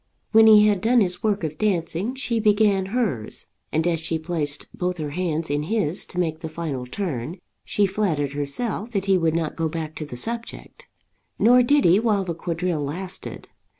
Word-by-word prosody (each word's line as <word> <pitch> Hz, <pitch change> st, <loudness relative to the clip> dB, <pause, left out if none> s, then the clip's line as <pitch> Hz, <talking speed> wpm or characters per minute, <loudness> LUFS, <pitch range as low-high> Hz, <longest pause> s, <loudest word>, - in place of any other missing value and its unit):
When 220 Hz, 0 st, +7 dB
he 210 Hz, -1 st, +8 dB
had 205 Hz, -3 st, +2 dB
done 240 Hz, +3 st, +4 dB
his 180 Hz, -4 st, 0 dB
work 210 Hz, -3 st, 0 dB
of 155 Hz, -1 st, -4 dB
dancing, 195 Hz, +3 st, -1 dB
she 245 Hz, -4 st, -1 dB
began 205 Hz, -3 st, +3 dB
hers, 195 Hz, -, -2 dB, 0.3 s
and 160 Hz, +1 st, +1 dB
as 170 Hz, -2 st, +1 dB
she 160 Hz, 0 st, -2 dB
placed 155 Hz, -3 st, -3 dB
both 180 Hz, 0 st, -2 dB
her 150 Hz, -3 st, -4 dB
hands 165 Hz, -1 st, -2 dB
in 145 Hz, +1 st, 0 dB
his 180 Hz, -1 st, -1 dB
to -, -, -11 dB
make 160 Hz, -3 st, -1 dB
the 160 Hz, -1 st, -6 dB
final 155 Hz, -6 st, -4 dB
turn, 155 Hz, -1 st, -4 dB, 0.3 s
she 205 Hz, -, +2 dB
flattered 185 Hz, -8 st, 0 dB
herself 190 Hz, +10 st, -3 dB
that 195 Hz, -2 st, -1 dB
he 195 Hz, -1 st, +4 dB
would 165 Hz, -3 st, +1 dB
not 160 Hz, -2 st, -1 dB
go 165 Hz, -1 st, -1 dB
back 155 Hz, -1 st, -4 dB
to 155 Hz, -, -4 dB
the 125 Hz, -, -7 dB
subject. 230 Hz, -, -5 dB, 0.5 s
Nor 245 Hz, +2 st, +6 dB
did 285 Hz, +4 st, +3 dB
he 175 Hz, +4 st, +6 dB
while 215 Hz, -3 st, +1 dB
the 175 Hz, -2 st, -3 dB
quadrille 170 Hz, -1 st, -2 dB
lasted. 185 Hz, +6 st, -5 dB
180 Hz, 190 wpm, -23 LUFS, 160-210 Hz, 0.5 s, he